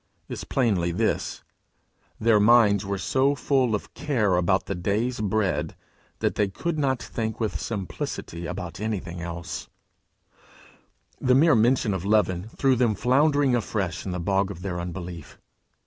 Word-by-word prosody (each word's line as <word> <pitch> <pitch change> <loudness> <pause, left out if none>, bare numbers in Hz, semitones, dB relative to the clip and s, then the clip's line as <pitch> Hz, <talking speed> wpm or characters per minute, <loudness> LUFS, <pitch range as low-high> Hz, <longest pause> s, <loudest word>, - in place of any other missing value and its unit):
is - - -6
plainly 100 -10 +1
this: 85 - -1 0.8
their 110 -1 +4
minds 105 -2 +5
were 100 0 -2
so 135 +8 +1
full 130 -4 +1
of 105 - -6
care 110 -11 +1
about 95 +2 +2
the - - -3
day's 105 +7 -1
bread, 105 -2 0 0.5
that - - +1
they 105 - +1
could 155 - -3
not 135 -3 +1
think 110 -2 -4
with 110 -3 -2
simplicity 90 -4 -5
about 90 +3 -6
anything 95 -5 -4
else; 85 -1 -6 1.5
the 125 0 +3
mere 155 +3 +5
mention 115 -2 +3
of 95 -2 -3
leaven 100 -2 +1
threw 135 -2 +3
them 120 -3 +2
floundering 140 +4 +3
afresh 100 -7 -1
in 95 - -4
the 90 - -3
bog 95 +2 +1
of 90 -2 -8
their 90 -3 -3
unbelief. 85 -2 -7
105 Hz, 145 wpm, -25 LUFS, 90-125 Hz, 1.5 s, minds